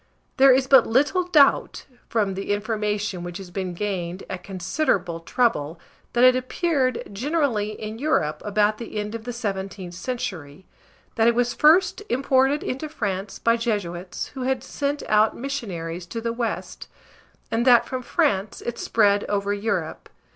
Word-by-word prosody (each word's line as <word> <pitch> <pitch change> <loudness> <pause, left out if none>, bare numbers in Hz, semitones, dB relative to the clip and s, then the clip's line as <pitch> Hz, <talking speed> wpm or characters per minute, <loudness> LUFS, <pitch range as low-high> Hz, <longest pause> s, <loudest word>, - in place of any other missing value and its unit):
There 270 0 +7
is 260 +1 +4
but 270 0 +6
little 290 +10 +2
doubt, 295 -6 +3 0.2
from 210 -4 0
the 195 +2 -4
information 210 -3 -2
which 175 0 -6
has 190 -2 -10
been 185 -1 -4
gained 185 -2 -3
at 185 -1 -5
considerable 185 - -1
trouble, 165 - 0 0.3
that 240 - +3
it 255 0 +7
appeared, 255 -1 0
generally, 245 -4 0
in 215 +1 -6
Europe 200 - 0
about 210 +1 +1
the 230 -2 -7
end 210 +1 -3
of 230 -1 -6
the 245 - -3
17th 195 -5 -5
century; 180 - -5 0.5
that 225 0 +4
it 235 - +4
was 245 0 +1
first 360 +7 +4
imported 265 +2 +2
into 270 +4 -4
France 200 -8 -3
by 230 0 +2
Jesuits, 195 -6 -3
who 265 - -8
had 260 0 0
been - - -13
sent 285 0 -2
out 215 +1 +3
missionaries 180 -10 -5
to 230 - -5
the 230 0 -2
West; 235 -1 -4 0.6
and 225 +1 +1
that 240 -2 +7
from 255 -1 -4
France 235 - 0
it 240 0 -5
spread 205 -2 +2
over 200 0 -1
Europe. 205 +3 -3
220 Hz, 160 wpm, -24 LUFS, 195-255 Hz, 0.6 s, There